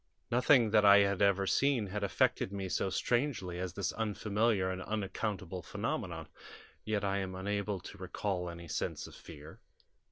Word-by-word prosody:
"Nothing 120 -2 +5
that 105 -1 +5
I 100 0 +9
had 100 -1 +1
ever 100 -1 +3
seen 135 +1 +2
had 100 +2 -4
affected 100 -1 +1
me 100 -2 -4
so 95 - 0
strangely 120 -5 -1
as 90 -1 -3
this 100 -1 -1
unfamiliar 105 -2 0
and 95 0 -4
unaccountable 95 -3 -3
phenomenon, 100 - -4 0.6
yet 105 -2 -1
I 100 0 0
am 95 -1 -4
unable 100 +1 -2
to 100 - -10
recall 95 -1 -3
any 85 0 -9
sense - - -3
of - - -11
fear. 75 0 -12
100 Hz, 160 wpm, -33 LUFS, 95-105 Hz, 0.6 s, I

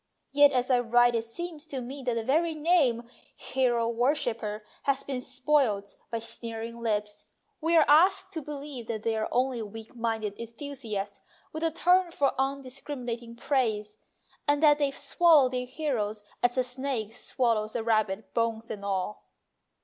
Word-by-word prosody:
Yet 285 0 +6
as 255 0 +1
I 250 - +5
write 240 0 +4
it 230 -1 0
seems 320 +5 -7
to 275 -4 -4
me 260 +3 -7
that 245 -2 -1
the 230 - -1
very 320 +6 +1
name 295 -8 +2 0.3
"hero 240 -3 0
wor 240 +5 +2
shipper 220 -6 -3
" - - -30
has 275 - +1
been 260 -2 -4
spoilt 250 -8 0
by 230 - -2
sneering 230 0 -6
lips; 210 -2 -2 0.4
we 330 +2 +3
are 315 - +6
asked 375 +5 +5
to 320 - -3
believe 285 -4 -7
that 220 -2 -4
they 225 -1 0
are 220 0 -1
only 250 -1 +1
weak 220 +2 -9
minded 225 -3 -2
enthusiasts 230 -4 -5 0.3
with 315 - -4
a 330 - +2
turn 360 +3 +3
for 285 -5 +1
un 275 +1 -1
discriminating 245 -3 -6
praise, 220 -5 -1 0.5
and 290 +1 +2
that 295 -1 +6
they 285 -1 +2
swallow 285 0 +4
their 250 0 -3
heroes, 235 -7 -2 0.2
as 245 +1 +2
a 255 - +3
snake 250 -3 -3
swallows 230 -3 0
a 230 - -1
rabbit, 215 -2 0
bones 230 -1 -1
and 205 -2 -6
all. 195 +1 -2
245 Hz, 170 wpm, -28 LUFS, 225-285 Hz, 0.5 s, Yet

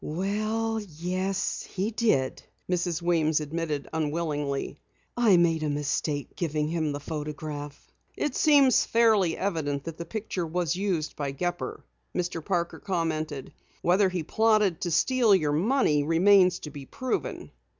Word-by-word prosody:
"Well, 215 +6 -1 0.2
yes, 185 +3 -1
he 200 +4 -3
did," 210 - +1 0.3
Mrs. 175 -2 -1
Weems 160 -3 +2
admitted 150 -1 -3
unwillingly. 150 -3 -2 0.4
"I 225 -6 +5
made 165 -2 +3
a 155 - -1
mistake 145 0 -2
giving 150 -3 -1
him 160 -2 -1
the 145 - -4
photograph." 150 -1 -6 0.3
"It 295 - -1
seems 285 -5 +5
fairly 220 -7 +3
evident 155 -7 -2
that 165 -1 -7
the 170 - -4
picture 195 -3 -4
was 170 +1 -1
used 180 -5 -1
by 140 -2 -3
Gepper," 175 +5 -3 0.3
Mr. 175 -2 -2
Parker 170 -2 -1
commented. 160 -7 -3 0.3
"Whether 190 +3 +4
he 180 -3 -3
plotted 215 -1 +2
to 175 - -1
steal 230 +5 +4
your 150 -5 +1
money 175 - +2
remains 180 +4 +5
to 150 - -7
be 140 -2 -9
proven. 260 -2 -3
170 Hz, 140 wpm, -27 LUFS, 150-195 Hz, 0.4 s, I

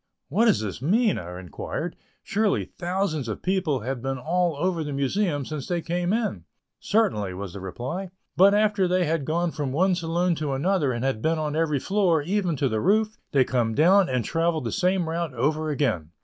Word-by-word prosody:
"What 210 +10 +3
does 220 - +3
this 105 +1 -5
mean?" 210 - +2
I 90 +1 -7
inquired; 90 -2 -5 0.3
"surely 210 0 +1
thousands 175 -6 -2
of 110 - -5
people 180 -8 0
have 125 +2 -4
been 135 +1 -2
all 170 +4 0
over 170 +2 -1
the 150 - -5
Museum 145 +2 0
since 150 -2 -5
they 175 -1 0
came 175 +2 -1
in." 225 0 -1 0.3
"Certainly," 105 - +1
was 95 -1 -6
the 100 - -7
reply 130 - -5 0.3
"but 200 +2 +6
after 210 -3 +2
they 180 0 +2
have 160 -3 -1
gone 170 +3 0
from 145 -4 -3
one 185 +7 +2
saloon 170 +1 0
to 150 -3 -2
another 150 0 +1
and 120 +1 -2
have 130 -5 -1
been 160 +4 +1
on 155 -1 -2
every 155 -2 +1
floor, 180 -3 +2
even 180 -1 0
to 140 0 +1
the 110 -3 -1
roof, 215 +3 +2 0.2
they 135 -2 +4
come 120 -3 0
down 185 +5 +5
and 125 -4 0
travel 165 0 +1
the - - -3
same 185 -3 +1
route 165 -4 -3
over 155 +6 0
again." 125 - -1
160 Hz, 200 wpm, -25 LUFS, 135-185 Hz, 0.3 s, but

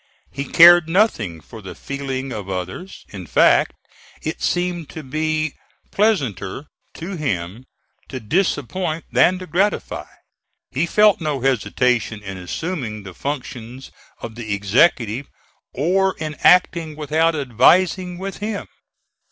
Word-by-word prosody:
He 140 0 -4
cared 175 +2 +7
nothing 120 - +1
for 110 +7 -12
the 95 - -9
feeling 135 -2 -5
of 100 -3 -6
others. 95 - -6
In 95 -4 -9
fact - - +4 0.5
it 155 - -4
seemed 175 -3 -1
to 160 - -8
be 155 +2 -1 0.4
pleasanter 135 - 0 0.3
to 180 +3 -6
him 100 - -3 0.4
to 130 - -5
disappoint 160 - -1
than 185 - +4
to 185 - -8
gratify. 190 +5 -1 0.6
He 155 +6 0
felt 210 0 +4
no 150 -4 -2
hesitation 125 -3 0
in 95 -1 -6
assuming 110 - -5
the 95 -2 -9
functions 125 - -6 0.3
of 115 - -7
the 110 -3 -3
executive, 115 - +2 0.4
or 190 +6 +1
in 155 -1 -4
acting 170 -3 +3
without 155 +2 +1
advising 175 - +2
with 195 +1 -6
him. 210 0 -4
145 Hz, 125 wpm, -20 LUFS, 115-175 Hz, 0.6 s, cared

